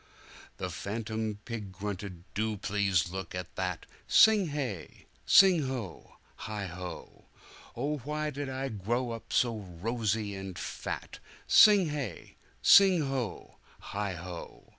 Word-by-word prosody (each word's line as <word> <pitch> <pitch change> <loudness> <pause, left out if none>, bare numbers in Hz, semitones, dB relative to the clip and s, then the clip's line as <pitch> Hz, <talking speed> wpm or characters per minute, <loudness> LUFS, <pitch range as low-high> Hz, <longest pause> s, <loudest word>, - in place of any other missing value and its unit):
The - - -4
phantom 110 0 -4
pig 110 -5 -5
grunted, 95 -2 -6
"Do 110 +1 -1
please 95 -3 +1
look 95 -2 -6
at 90 -1 -6
that!" 90 -3 -3 0.2
Sing 215 -4 +6
hey! 135 - -5 0.2
sing 180 -7 +6
ho! 120 -10 -6 0.2
heigho!"Oh! 100 - -7
why 150 +3 -3
did 140 0 -5
I 135 +1 -3
grow 120 +3 -2
up 115 -1 -8
so 120 -2 +2
rosy 105 +2 -2
and 95 -2 -7
fat!" - - -5 0.3
Sing 205 -6 +7
hey! 140 - -5 0.3
sing 190 -4 +7
ho! 130 -8 -4 0.3
heigho!" 90 -4 -5
110 Hz, 115 wpm, -30 LUFS, 95-135 Hz, 0.3 s, Sing